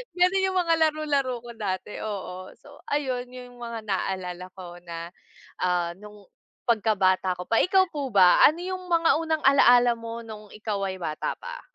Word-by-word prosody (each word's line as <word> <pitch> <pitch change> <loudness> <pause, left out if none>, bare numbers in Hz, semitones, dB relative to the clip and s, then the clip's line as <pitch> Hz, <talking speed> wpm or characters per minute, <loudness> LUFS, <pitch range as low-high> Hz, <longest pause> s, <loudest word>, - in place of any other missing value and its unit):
ganun 365 +2 +3
yung 375 - -1
mga 335 -1 +2 0.2
laro-laro 290 -4 -1
ko 240 - -9
dati, 200 -1 -4
oo, 185 -3 -6
so, 285 0 -16
ayun 260 -4 -1
yung 250 -1 -11
mga 235 -1 -5
naalala 185 -2 -3
ko 175 -2 -10
na, 170 0 -7 0.5
ah, 175 -1 0
nung 210 0 -13 0.5
pagkabata 195 -5 +2
ko 180 - -5
pa. 225 - +3
Ikaw 375 0 +3
po 285 -3 -4
ba 185 -4 +6
ano 315 +4 +4
yung 370 0 -5
mga 335 -2 +4
unang 320 -1 0
alala 245 -3 +6
mo 230 0 -7
nung 215 -2 -10
ikaw 210 -2 -4
ay 190 - -4
bata 155 -2 -2
pa? - - -8
230 Hz, 170 wpm, -26 LUFS, 185-285 Hz, 0.5 s, ba